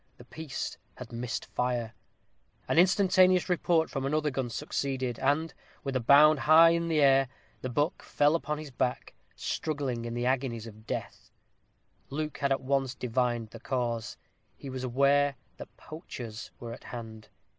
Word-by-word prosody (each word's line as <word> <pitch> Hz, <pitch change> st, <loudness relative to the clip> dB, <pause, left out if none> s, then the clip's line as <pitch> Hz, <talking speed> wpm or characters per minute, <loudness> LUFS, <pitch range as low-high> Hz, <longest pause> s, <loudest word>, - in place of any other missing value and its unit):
The 120 Hz, -, -14 dB
piece 155 Hz, 0 st, -6 dB, 0.2 s
had 125 Hz, -2 st, -10 dB
missed 120 Hz, +1 st, -4 dB
fire. 120 Hz, -2 st, -2 dB, 0.7 s
An -, -, +3 dB
instantaneous 185 Hz, 0 st, +4 dB
report 170 Hz, -2 st, +2 dB
from 135 Hz, -, -4 dB
another 150 Hz, +2 st, 0 dB
gun 130 Hz, -2 st, -2 dB
succeeded; 130 Hz, 0 st, -3 dB
and, 150 Hz, +3 st, +1 dB, 0.3 s
with 135 Hz, -1 st, -3 dB
a -, -, +3 dB
bound 145 Hz, +5 st, +6 dB
high 160 Hz, +3 st, +7 dB
in 170 Hz, 0 st, 0 dB
air, 135 Hz, -4 st, +4 dB, 0.3 s
the 130 Hz, -, -3 dB
buck 145 Hz, +6 st, 0 dB
fell 145 Hz, +1 st, +2 dB
upon 150 Hz, -2 st, -1 dB
his 150 Hz, -2 st, -8 dB
back, 125 Hz, 0 st, -2 dB, 0.2 s
struggling 135 Hz, -6 st, -3 dB
in 120 Hz, 0 st, -4 dB
the 120 Hz, 0 st, -1 dB
agonies 125 Hz, -3 st, -1 dB
of 110 Hz, -1 st, -13 dB
death. -, -, -5 dB, 0.8 s
Luke 150 Hz, +2 st, -4 dB
had 140 Hz, -1 st, 0 dB
at 135 Hz, -, +1 dB
once 135 Hz, -1 st, 0 dB
divined 120 Hz, -2 st, -1 dB
the 115 Hz, -, -10 dB
cause; 120 Hz, -3 st, -2 dB, 0.4 s
he 135 Hz, -, -8 dB
was 130 Hz, 0 st, -5 dB
aware 140 Hz, +3 st, +3 dB, 0.2 s
that -, -, -11 dB
poachers 120 Hz, -, -8 dB
were 115 Hz, -1 st, -6 dB
at -, -, -12 dB
hand. 110 Hz, -2 st, -8 dB
135 Hz, 155 wpm, -29 LUFS, 120-150 Hz, 0.8 s, high